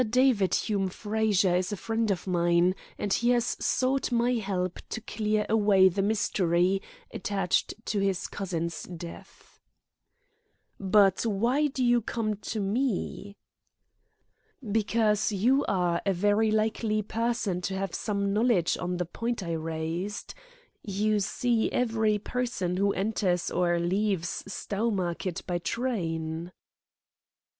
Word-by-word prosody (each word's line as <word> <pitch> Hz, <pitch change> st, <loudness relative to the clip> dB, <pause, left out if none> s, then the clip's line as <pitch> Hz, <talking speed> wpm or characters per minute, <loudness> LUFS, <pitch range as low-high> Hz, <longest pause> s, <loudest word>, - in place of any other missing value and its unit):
David 245 Hz, -5 st, +3 dB
Hume 200 Hz, -3 st, 0 dB
Frazer 205 Hz, -2 st, +1 dB
is 180 Hz, +2 st, -1 dB
a 205 Hz, -, -3 dB
friend 225 Hz, +2 st, -1 dB
of 190 Hz, -3 st, -1 dB
mine, 175 Hz, 0 st, +3 dB, 0.2 s
and 205 Hz, -2 st, -1 dB
he 240 Hz, -, +2 dB
has 240 Hz, -1 st, +2 dB
sought 260 Hz, +1 st, +1 dB
my 240 Hz, +1 st, +2 dB
help 190 Hz, -5 st, -2 dB
to -, -, -3 dB
clear 215 Hz, -1 st, -1 dB
away 205 Hz, -3 st, +5 dB
the 190 Hz, +2 st, -1 dB
mystery 195 Hz, -3 st, +1 dB, 0.3 s
attached 195 Hz, -2 st, 0 dB
to 210 Hz, -, -1 dB
his 195 Hz, -2 st, 0 dB
cousin's 170 Hz, -4 st, -3 dB
death." 170 Hz, -1 st, -11 dB, 1.2 s
"But 195 Hz, -1 st, +4 dB
why 235 Hz, +7 st, +2 dB
do 265 Hz, -2 st, -1 dB
you 240 Hz, 0 st, +4 dB
come 215 Hz, -1 st, -2 dB
to 215 Hz, +2 st, -4 dB
me?" 205 Hz, -1 st, -2 dB, 1.3 s
"Because 215 Hz, 0 st, +1 dB
you 245 Hz, +8 st, +3 dB
are 175 Hz, -3 st, +1 dB
a 195 Hz, -, +1 dB
very 205 Hz, +4 st, +2 dB
likely 215 Hz, 0 st, 0 dB
person 225 Hz, -4 st, -1 dB
to 190 Hz, +1 st, -3 dB
have 195 Hz, -2 st, -3 dB
some 200 Hz, -2 st, -1 dB
knowledge 215 Hz, -6 st, +2 dB
on 180 Hz, 0 st, -2 dB
the 180 Hz, -, -1 dB
point 230 Hz, +5 st, -3 dB
I 170 Hz, -, -4 dB
raised. 165 Hz, +5 st, -4 dB, 0.5 s
You 210 Hz, +1 st, 0 dB
see 225 Hz, +3 st, 0 dB
every 220 Hz, -3 st, +1 dB
person 205 Hz, -5 st, -2 dB
who 200 Hz, +1 st, +2 dB
enters 190 Hz, -3 st, 0 dB
or 175 Hz, -1 st, +2 dB
leaves 185 Hz, 0 st, -1 dB
Stowmarket 195 Hz, -4 st, -2 dB
by 175 Hz, -1 st, -1 dB
train." 170 Hz, -7 st, -3 dB
200 Hz, 125 wpm, -28 LUFS, 180-220 Hz, 1.3 s, away